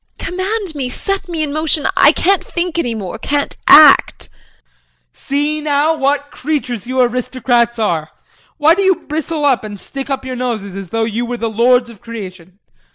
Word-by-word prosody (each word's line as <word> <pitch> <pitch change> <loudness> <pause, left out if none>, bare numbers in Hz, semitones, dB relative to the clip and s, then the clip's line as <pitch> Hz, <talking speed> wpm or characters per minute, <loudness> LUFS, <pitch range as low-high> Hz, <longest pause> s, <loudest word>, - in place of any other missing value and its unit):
Command 380 0 -3
me, 270 -4 -4
set 390 +7 -4
me 325 -2 -2
in 290 -2 -3
motion 310 -1 0
I - - +6
can't 390 +1 +1
think 345 -1 -3
any 240 -8 -1
more, 210 0 -6
can't 285 +4 -2
act 300 -2 +6
JEAN. - - -35 0.8
See 295 +2 -2
now, 295 +1 +1
what 285 -1 -1
creatures 255 -6 -3
you 260 +1 -2
aristocrats 245 -1 0
are! 170 -8 -1 0.5
Why 310 +1 +5
do 390 - 0
you 380 -2 +1
bristle 310 0 -3
up 265 -5 +2
and 205 -2 -8
stick 275 +8 -7
up 265 -1 -3
your 260 -1 -5
noses 225 -6 -4
as 195 -3 -7
though 225 +3 -1
you 225 +1 -2
were 245 0 -4
the 230 -1 -3
lords 245 +2 +3
of 220 - -17
creation. 190 -6 -9
265 Hz, 180 wpm, -16 LUFS, 230-310 Hz, 0.8 s, I